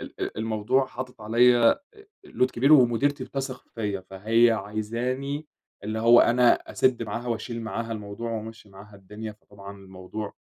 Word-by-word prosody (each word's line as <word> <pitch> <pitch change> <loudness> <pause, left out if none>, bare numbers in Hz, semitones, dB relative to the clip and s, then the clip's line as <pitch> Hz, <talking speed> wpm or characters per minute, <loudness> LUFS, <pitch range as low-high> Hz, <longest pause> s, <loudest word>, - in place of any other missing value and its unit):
ال - - -11
ال - - -4
الموضوع 115 +4 0
حاطط 125 -2 -8
عليّا 120 +2 +5
آآ 415 +9 -7 0.2
load 345 - +1
كبير 135 +5 +3
ومديرتي 135 +1 +4
بتثق 135 -2 -5
فيّا 105 -4 -3
فهي 110 +6 +2
عايزاني 120 +8 -3 0.4
اللي 110 +1 -3
هو 115 +1 +6
أنا 120 0 +5 0.2
أسِد 125 -3 +1
معاها 115 +3 -5
وأشيل 115 0 -4
معاها 115 +1 -4
الموضوع 105 +2 -6
وأمشّي 110 -1 -7
معاها 100 +2 -14
الدنيا، 105 +3 -8
فطبعًا 100 -1 -13
الموضوع 95 +2 -8
115 Hz, 150 wpm, -25 LUFS, 105-125 Hz, 0.4 s, هو